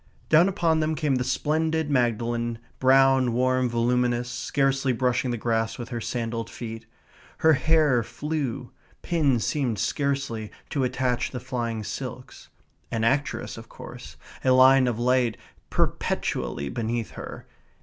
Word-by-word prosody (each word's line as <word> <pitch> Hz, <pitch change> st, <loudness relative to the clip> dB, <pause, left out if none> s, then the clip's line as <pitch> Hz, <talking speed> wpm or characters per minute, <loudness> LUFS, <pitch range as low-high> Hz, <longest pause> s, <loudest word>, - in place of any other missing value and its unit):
Down 165 Hz, +5 st, +6 dB
upon 170 Hz, -5 st, +1 dB
them 155 Hz, 0 st, 0 dB
came 150 Hz, -4 st, +1 dB
the 125 Hz, -, 0 dB
splendid 155 Hz, +4 st, 0 dB
Magdalen, 120 Hz, -2 st, 0 dB, 0.2 s
brown, 130 Hz, -1 st, +4 dB
warm, 130 Hz, +1 st, +2 dB
voluminous, 120 Hz, +1 st, +1 dB
scarcely 135 Hz, 0 st, 0 dB
brushing 125 Hz, +1 st, 0 dB
the 120 Hz, -, -1 dB
grass 115 Hz, 0 st, -1 dB
with 120 Hz, -1 st, -7 dB
her 120 Hz, -2 st, -4 dB
sandalled 115 Hz, -1 st, -3 dB
feet. 115 Hz, -1 st, -7 dB, 0.5 s
Her 160 Hz, 0 st, +5 dB
hair 150 Hz, -4 st, +3 dB
flew; 140 Hz, -1 st, -4 dB, 0.3 s
pins 145 Hz, -9 st, +1 dB
seemed 130 Hz, -7 st, -1 dB
scarcely 140 Hz, -4 st, -2 dB, 0.2 s
to 140 Hz, -, 0 dB
attach 125 Hz, -1 st, 0 dB
the 125 Hz, -, -5 dB
flying 120 Hz, -3 st, -3 dB
silks. -, -, -7 dB, 0.4 s
An 115 Hz, -1 st, -2 dB
actress 135 Hz, +5 st, 0 dB
of -, -, -13 dB
course, -, -, -10 dB, 0.3 s
a 130 Hz, -, +2 dB
line 130 Hz, 0 st, +6 dB
of 120 Hz, -3 st, -1 dB
light 125 Hz, -1 st, +2 dB, 0.3 s
perpetually 70 Hz, -, -1 dB
beneath 115 Hz, -, -3 dB
her. -, -, -8 dB
125 Hz, 135 wpm, -25 LUFS, 120-140 Hz, 0.5 s, Down